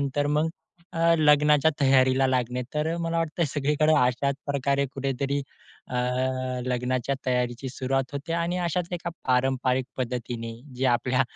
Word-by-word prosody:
त्यानंतर 140 +1 0
मग 150 +2 +1 0.5
अ, 165 0 +4
लग्नाच्या 150 0 +5
तयारीला 130 -1 +4
लागणे. 125 -1 0
तर 160 +2 0
मला 165 0 -1
वाटतंय 165 +1 0
सगळीकडं 150 +2 +2
अशाच 125 +2 +2
प्रकारे 140 0 +1
कुठेतरी 140 +1 -1 0.5
अ, - - -6 0.7
लग्नाच्या 125 +1 -1
तयारीची 125 +1 -1
सुरुवात 135 +1 -2
होते 145 +4 -4
आणि 170 +1 0
अशाच 175 0 -1
एका 170 0 -3 0.2
पारंपरिक 130 0 +2
पद्धतीने 120 -2 -4 0.2
जे 130 - +1
आपल्या 125 +1 +2
135 Hz, 130 wpm, -26 LUFS, 125-150 Hz, 0.7 s, लग्नाच्या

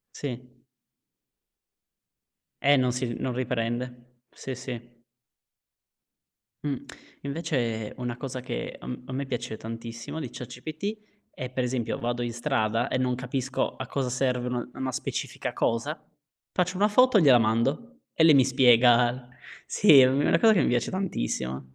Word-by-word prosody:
Sì. 125 -3 -5 2.2
Eh, 145 +1 +6
non 125 -1 +2
si 125 -2 -2
non 130 - -2
riprende. 125 0 -4
Sì, 130 - -6
sì. 120 -1 -7 1.8
Mh. 140 -2 -1 0.5
Invece 130 -8 -2
una 120 -1 -3
cosa 130 -1 -5
che 125 - -5
a - - -12
m 125 0 -6
a 130 - -8
me 135 +1 -3
piace 120 -4 -4
tantissimo 115 +5 -7
di 140 -6 -4
ChatGPT 155 - -6 0.3
è 125 - -6
per 130 0 -2
esempio: 125 -2 -2
vado 120 0 -2
in 120 -1 -2
strada 120 -2 0
e - - -1
non 125 -1 +1
capisco 130 +1 -2
a 130 - -5
cosa 130 0 -2
serve 125 0 0
un 125 0 -3
una 130 -1 -4
specifica - - -4
cosa, 115 0 -1 0.5
faccio 180 +1 0
una 205 +2 +3
foto 255 +1 +5
e - - +4
gliela 130 -5 +7
mando 135 - 0
e 160 - +4
lei 155 -3 +8
mi 135 - +6
spiega. 125 -1 +4 0.4
Sì, 155 -9 +6
è 130 - +8
u 135 +2 +1
è - - +2
una 165 - +4
cosa 225 -1 +7
che - - +3
mi - - +2
piace 120 -1 0
tantissimo. 65 - -2
125 Hz, 155 wpm, -27 LUFS, 120-140 Hz, 2.2 s, lei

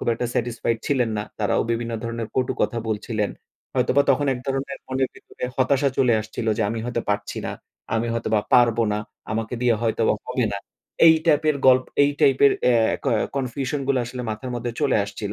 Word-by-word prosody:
খুব - - -3
একটা 120 - -2
satisfied 115 -1 -1
ছিলেন 125 -5 +1
না। - - -1 0.2
তারাও 105 - +2
বিভিন্ন 115 0 -3
ধরনের 115 -1 -4
কটু 130 -1 +1
কথা 120 - 0
বলছিলেন। 105 -1 -2 0.5
হয়তোবা 140 +2 +3
তখন 140 +2 +2
এক 125 - -7
ধরনের 135 0 -3
মনের 130 0 0
ভেতরে - - -9
হতাশা 135 +1 +2
চলে 125 -3 +4
আসছিল, 110 +1 -6
যে - - +2
আমি 115 - -3
হয়তো 120 -1 -2
পারছি 105 0 -2
না, - - -3 0.4
আমি 115 +1 0
হয়তোবা 110 -2 +1
পারব 120 -2 +5
না। 105 - 0 0.3
আমাকে 110 +2 -2
দিয়ে 120 -2 +4
হয়তোবা 110 -1 +2
হবে 125 -1 0
না। 100 - -2 0.5
এই 160 - +9
টাইপের 155 -1 +3
গল্প 130 0 +6 0.2
এই 145 - +4
টাইপের 140 +1 +5
অ্যা 120 -2 +5 0.3
ক - - -4 0.3
confusion 135 +2 -2
গুলা 135 -2 +2
আসলে 125 +1 -6
মাথার 110 +4 -5
মধ্যে 120 0 -3
চলে 145 -3 +2
আসছিল। 100 0 -5
120 Hz, 190 wpm, -23 LUFS, 115-135 Hz, 0.5 s, এই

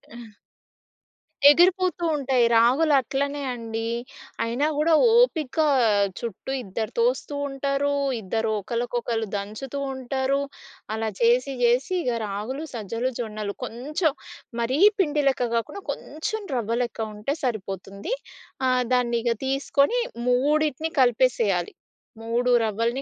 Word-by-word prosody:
ఆ! 225 -3 -12 1.1
ఎగిరిపోతూ 355 +2 +4
ఉంటాయి. 260 -4 +2
రాగులు 265 +7 +4
అట్లనే 280 +3 -2
అండీ. 225 -1 -4 0.5
అయినా 235 +6 0
గూడా 315 +2 +3 0.2
ఓపికా, 315 - +3 0.5
చుట్టూ 235 +2 -6
ఇద్దరు 215 +2 -4
తోస్తూ 465 -10 +1
ఉంటారూ, 275 +1 -1 0.3
ఇద్దరు 220 +3 -1
ఒకళ్ళకొకళ్ళు 235 0 -2
దంచుతూ 215 +8 -6
ఉంటారు. 265 +1 -1 0.5
అలా 220 0 -1
చేసి 245 +4 +3
జేసి 245 +9 +2
ఇగ 250 - 0 0.2
రాగులు, 215 +9 -4
సజ్జలు, 230 +3 -2
జొన్నలు, 215 -3 -4
కొంచం 295 +7 -1 0.5
మరీ 255 +5 0 0.2
పిండి 300 -5 +2
లెక్క 255 -3 +2
గాకుండా, 300 - -3
కొంచం 420 +8 -5
రవ్వ 230 -1 -1
లెక్క 235 -1 -6 0.2
ఉంటే 215 +8 -2
సరిపోతుంది. 200 - -4 0.5
ఆహ్, 255 -1 +2
దాన్నిగ 240 -1 +1 0.2
తీసుకొని 280 - +1 0.3
మూడిటిని 300 +4 +1
కలిపేసెయ్యాలి. 230 -7 +2 0.5
మూడు 240 +2 +1
రవ్వలని 230 +4 -1
250 Hz, 105 wpm, -24 LUFS, 230-285 Hz, 1.1 s, ఎగిరిపోతూ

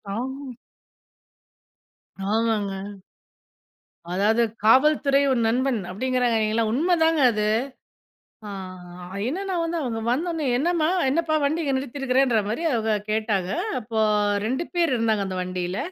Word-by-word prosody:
ஆமா. 265 +2 -5 1.8
ஆமாங்க. 205 -3 -1 1.2
அதாது 210 +5 +2 0.2
காவல்துறை 275 +4 +4
உன் 235 -3 +1
நண்பன் 250 +1 +1
அப்டிங்கிறாங்கேங்கல்ல 230 -1 +1
உண்மைதாங்க 325 +3 +2
அது. 210 -1 -1 1.0
ஆ - - -6 0.8
என்னென்னா 380 +7 -3
வந்து 330 +1 -2
அவங்க 230 -4 -3
வந்தோன்னே 320 +4 -1
"என்னம்மா? 320 +3 +1 0.2
என்னப்பா? 320 +2 0
வண்டி 310 +4 0
இங்கே 280 -3 0
நிறுத்தியிருக்கிறே"ன்ற 265 -2 +1
மாரி 225 +10 -2
அவங்க 225 -2 0 0.2
கேட்டாக. 215 -4 0 0.3
அப்போ 220 -1 -3 0.5
2 265 +8 -1
பேர் 340 -5 +2
இருந்தாங்க 220 -3 +1
அந்த 185 - -4
வண்டியில. 180 +1 -3
250 Hz, 105 wpm, -24 LUFS, 220-290 Hz, 1.8 s, காவல்துறை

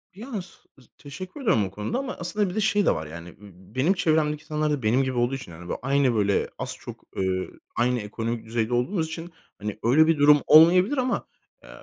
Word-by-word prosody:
Ya, 220 +6 -9
s 175 - -14 0.3
ız 125 - -21
teşekkür 185 - -9
ediyorum 115 - +2
o 95 - -7
konuda 105 - -3
ama 275 -1 -4
aslında 190 +3 -1
bir 180 - -7
de 215 - 0
şey 205 -1 +2
de - - +4
var. 80 0 -5
I 85 +2 -10 0.4
benim 145 +9 +3
çevremdeki 155 -4 +1
insanlar 155 -1 -1
da 145 -4 -2
benim 120 +5 +3
gibi 130 -2 -3
olduğu 120 +3 +1
için 125 -9 -9
yani 85 +2 -11
böyle - - -4
aynı 135 -2 +2
böyle 100 -2 +1
az - - -4
çok, - - -10
eee, 95 -1 -1 0.3
aynı 125 0 +1
ekonomik 115 +2 -4
düzeyde 115 +1 -2
olduğumuz 160 +8 0
için 165 +2 -7 0.3
hani 105 0 -5
öyle 145 +7 +5
bir 165 -2 +3
durum 145 0 +6
olmayabilir 180 - +6
ama, 255 -1 -1 0.4
eee, - - -15
140 Hz, 215 wpm, -25 LUFS, 115-170 Hz, 0.4 s, durum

